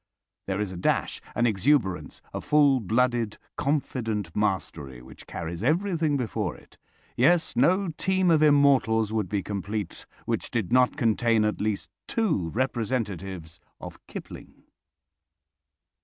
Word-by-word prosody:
There 95 Hz, 0 st, -1 dB
is 105 Hz, -3 st, -2 dB
a 90 Hz, -, -7 dB
dash, 90 Hz, -, 0 dB
an 120 Hz, -, +2 dB
exuberance, 95 Hz, -, +1 dB
a -, -, -4 dB
full 145 Hz, -3 st, +4 dB
blooded, 115 Hz, +1 st, 0 dB, 0.2 s
confident 115 Hz, -, -2 dB
mastery 80 Hz, -10 st, -2 dB
which 65 Hz, +2 st, -14 dB
carries 85 Hz, +2 st, -5 dB
everything 160 Hz, 0 st, +1 dB
before 110 Hz, -, -2 dB
it. -, -, -19 dB, 0.4 s
Yes, 160 Hz, +7 st, +3 dB
no 180 Hz, +9 st, +3 dB
team 185 Hz, +3 st, +1 dB
of 155 Hz, -2 st, +4 dB
immortals 135 Hz, -7 st, +4 dB
would 110 Hz, -4 st, -1 dB
be 100 Hz, -2 st, -1 dB
complete 100 Hz, +1 st, -5 dB, 0.2 s
which -, -, -2 dB
did 110 Hz, -3 st, -2 dB
not 125 Hz, 0 st, +4 dB
contain 115 Hz, -1 st, +2 dB
at 105 Hz, -, -1 dB
least 105 Hz, -1 st, -2 dB, 0.2 s
two 165 Hz, -, 0 dB
representatives 100 Hz, -8 st, -3 dB, 0.2 s
of -, -, -9 dB
Kipling. -, -, -10 dB
115 Hz, 125 wpm, -26 LUFS, 95-140 Hz, 0.4 s, full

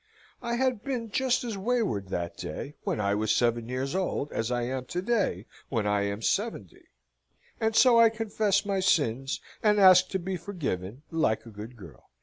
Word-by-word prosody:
I 235 Hz, -1 st, -2 dB
had 250 Hz, -3 st, 0 dB
been 240 Hz, -5 st, -3 dB
just 260 Hz, +2 st, +1 dB
as 225 Hz, -5 st, -4 dB
wayward 210 Hz, -, 0 dB
that 85 Hz, -2 st, -4 dB
day, 140 Hz, -, -6 dB
when -, -, -1 dB
I 100 Hz, -1 st, +1 dB
was 105 Hz, +1 st, 0 dB
seven 120 Hz, -1 st, +1 dB
years 130 Hz, +3 st, -2 dB
old, 185 Hz, -6 st, -2 dB
as 115 Hz, -, -2 dB
I 120 Hz, -1 st, 0 dB
am 130 Hz, +1 st, -3 dB
to 175 Hz, -, -4 dB
day, 200 Hz, -, 0 dB, 0.2 s
when 115 Hz, -5 st, -1 dB
I 105 Hz, -1 st, +1 dB
am 100 Hz, +2 st, -4 dB
seventy, 195 Hz, -, -2 dB, 0.7 s
and 220 Hz, 0 st, 0 dB
so 240 Hz, -2 st, +6 dB
I 230 Hz, -1 st, +7 dB
confess 215 Hz, -2 st, 0 dB
my 200 Hz, -1 st, 0 dB
sins, 135 Hz, -7 st, +1 dB, 0.2 s
and 210 Hz, -1 st, +3 dB
ask 185 Hz, -1 st, +7 dB
to 190 Hz, -, -1 dB
be 185 Hz, +1 st, -4 dB
forgiven, 140 Hz, -, -5 dB
like 160 Hz, -11 st, 0 dB
a 115 Hz, -, -11 dB
good 110 Hz, +4 st, -9 dB
girl." 85 Hz, -, -14 dB
165 Hz, 185 wpm, -28 LUFS, -, 0.7 s, I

